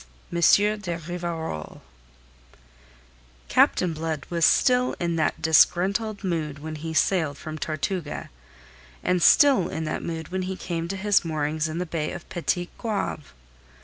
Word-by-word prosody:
M. 170 Hz, -, -1 dB, 0.4 s
de 175 Hz, -5 st, -4 dB
RIVAROL 170 Hz, -, -5 dB, 1.7 s
Captain 180 Hz, -2 st, +3 dB
Blood 160 Hz, -2 st, -4 dB
was 170 Hz, -1 st, +3 dB
still 250 Hz, -1 st, +3 dB
in 170 Hz, -1 st, -1 dB
that 155 Hz, -, -1 dB
disgruntled 195 Hz, +7 st, +3 dB
mood 160 Hz, -6 st, -2 dB
when 155 Hz, +2 st, -7 dB
he 160 Hz, +2 st, -5 dB
sailed 160 Hz, -3 st, +1 dB
from 155 Hz, -1 st, -7 dB
Tortuga, 155 Hz, +1 st, -3 dB, 0.7 s
and 180 Hz, -1 st, +1 dB
still 275 Hz, -, +5 dB
in 160 Hz, -, -4 dB
that 155 Hz, -, -3 dB
mood 160 Hz, -2 st, -5 dB
when 190 Hz, +1 st, -2 dB
he 185 Hz, +1 st, -3 dB
came 170 Hz, -2 st, -4 dB
to 195 Hz, +2 st, -4 dB
his 205 Hz, +1 st, +2 dB
moorings 155 Hz, -1 st, -1 dB
in 155 Hz, -, -4 dB
the 180 Hz, -, -2 dB
bay 160 Hz, -2 st, -3 dB
of 175 Hz, -, -9 dB
Petit 175 Hz, 0 st, -2 dB
Goave. 205 Hz, -, -3 dB
170 Hz, 145 wpm, -25 LUFS, 155-185 Hz, 1.7 s, still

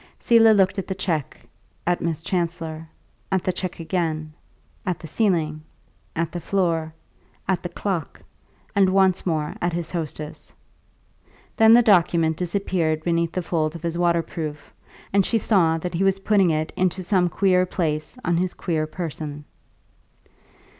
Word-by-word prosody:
Selah 225 Hz, -1 st, +5 dB
looked 195 Hz, -1 st, +3 dB
at 195 Hz, -, -5 dB
the 190 Hz, -, -3 dB
cheque, 165 Hz, -6 st, -2 dB, 0.5 s
at 175 Hz, 0 st, +1 dB
Miss 165 Hz, -1 st, -2 dB
Chancellor, 165 Hz, -3 st, -3 dB, 0.4 s
at 190 Hz, -2 st, +1 dB
the 185 Hz, -, 0 dB
cheque 185 Hz, -1 st, -5 dB
again, 160 Hz, -3 st, -2 dB, 0.5 s
at 180 Hz, -2 st, -1 dB
the -, -, -11 dB
ceiling, 160 Hz, -4 st, 0 dB, 0.5 s
at 165 Hz, 0 st, -1 dB
the 175 Hz, -, -4 dB
floor, 165 Hz, -5 st, 0 dB, 0.6 s
at 190 Hz, -2 st, +1 dB
the 175 Hz, -, -5 dB
clock, 175 Hz, -2 st, -3 dB, 0.6 s
and 195 Hz, -2 st, +5 dB
once 190 Hz, -1 st, +3 dB
more 155 Hz, -3 st, -1 dB
at 175 Hz, 0 st, 0 dB
his 170 Hz, -1 st, -3 dB
hostess; 155 Hz, -3 st, -6 dB, 1.0 s
then 220 Hz, 0 st, +7 dB
the 240 Hz, +1 st, +7 dB
document 170 Hz, -5 st, +4 dB
disappeared 170 Hz, -3 st, -1 dB
beneath 170 Hz, -1 st, 0 dB
the 185 Hz, -, -2 dB
folds 160 Hz, -1 st, -1 dB
of 170 Hz, -, -9 dB
his 170 Hz, 0 st, -2 dB
waterproof, 165 Hz, -3 st, -1 dB, 0.4 s
and 200 Hz, 0 st, +5 dB
she 230 Hz, -, +1 dB
saw 180 Hz, -7 st, +3 dB
that 175 Hz, +2 st, -4 dB
he 175 Hz, +3 st, 0 dB
was 195 Hz, 0 st, +3 dB
putting 195 Hz, -2 st, +3 dB
it 155 Hz, 0 st, -1 dB
into 185 Hz, 0 st, 0 dB
some 180 Hz, -1 st, +2 dB
queer 185 Hz, 0 st, +2 dB
place 155 Hz, +3 st, -2 dB
on 175 Hz, -1 st, +2 dB
his 180 Hz, +1 st, -1 dB
queer 155 Hz, -3 st, -1 dB
person. 155 Hz, -3 st, -5 dB
170 Hz, 155 wpm, -23 LUFS, 160-190 Hz, 1.0 s, then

